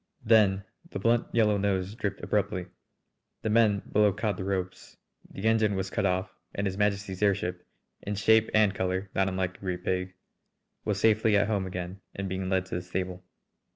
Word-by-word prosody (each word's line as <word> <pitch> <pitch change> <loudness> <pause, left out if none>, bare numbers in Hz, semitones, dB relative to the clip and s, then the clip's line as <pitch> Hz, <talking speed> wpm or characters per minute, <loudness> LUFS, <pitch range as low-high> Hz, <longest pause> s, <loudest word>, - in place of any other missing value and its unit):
Then 105 -3 +4 0.3
the - - -5
blunt 115 +4 +2
yellow 105 -3 +3
nose 95 -1 0
dipped 105 -4 -4
abruptly. 95 -3 0 0.8
The 110 - 0
men 105 -3 +3
below 105 -1 +4
caught 105 +1 -1
the 95 - -5
ropes, 95 -1 -4 0.3
the 95 - -9
engine 110 -2 +3
was 95 0 -3
cut 100 - +1
off, 95 0 -1 0.2
and 100 - -1
His 95 -1 -1
Majesty's 100 -2 -1
airship, 90 -3 0 0.3
in 105 - -3
shape 110 +2 +4
and 105 -2 +4
colour 95 0 -2
not 95 0 +2
unlike 95 -1 -2
a - - -27
great 90 -1 -4
pig, 90 0 -1 0.7
was 105 -2 0
safely 110 0 +4
at 100 - +3
home 100 -3 -1
again 90 +1 -6
and 100 0 -3
being 95 0 -3
led 95 -1 +1
to 95 - -10
the - - -3
stable. 90 0 -4
100 Hz, 185 wpm, -28 LUFS, 95-105 Hz, 0.8 s, Then